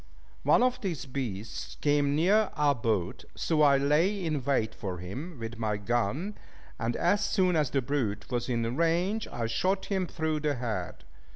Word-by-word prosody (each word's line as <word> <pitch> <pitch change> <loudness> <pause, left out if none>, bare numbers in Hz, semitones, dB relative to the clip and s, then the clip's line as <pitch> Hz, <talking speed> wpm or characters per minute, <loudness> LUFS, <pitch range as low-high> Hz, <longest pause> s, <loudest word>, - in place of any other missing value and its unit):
One - - +4
of 255 0 +1
these 175 - -3
beasts 120 -6 -5
came 145 -1 +2
near 195 +7 +4
our 145 -1 +3
boat; 110 -7 -1
so 160 -2 +1
I 140 -2 +6
lay 165 +8 +2
in 150 -4 -1
wait 130 -5 +1
for 95 -3 -5
him 130 - -6
with 115 0 -6
my 105 -2 0
gun; 120 - -1 0.4
and 115 +1 -1
as 200 +4 +2
soon 190 -3 +2
as 150 -4 +2
the 135 -1 0
brute 120 -5 -2
was 120 0 -1
in 115 0 0
range, 175 +7 +1
I 115 - -3
shot 185 - 0
him 190 -3 -1
through 160 -2 -1
the 150 -1 0
head. 110 -8 -4
140 Hz, 175 wpm, -29 LUFS, 115-175 Hz, 0.4 s, I